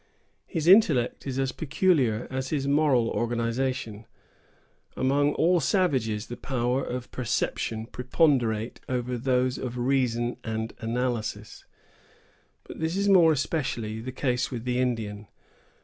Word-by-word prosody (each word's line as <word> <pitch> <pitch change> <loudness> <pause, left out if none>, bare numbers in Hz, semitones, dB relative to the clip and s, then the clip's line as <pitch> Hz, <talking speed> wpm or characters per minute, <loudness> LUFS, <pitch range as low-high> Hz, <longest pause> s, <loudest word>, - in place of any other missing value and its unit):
His 165 -4 -3
intellect 160 - +4
is 130 -1 -3
as 135 -1 0
peculiar 140 - +1
as 130 0 -3
his 140 -3 -1
moral 140 -5 +3
organization. 115 -1 -2 0.9
Among 145 +2 +2
all 175 +1 +3
savages, 130 - +1
the 120 - -8
powers 125 0 -1
of 125 0 -5
perception 110 -2 -2
preponderate 125 -3 0
over 125 -1 -2
those 125 +1 0
of 125 -1 -5
reason 120 -2 0
and 110 0 -3
analysis; 120 0 -3 1.0
but - - -10
this 160 +3 -1
is 200 0 +1
more 175 -4 +6
especially 130 -7 -2
the 125 +3 -6
case 125 -1 -1
with 120 -4 -5
the 125 0 0
Indian. 110 -4 -2
125 Hz, 125 wpm, -26 LUFS, 115-140 Hz, 1.0 s, more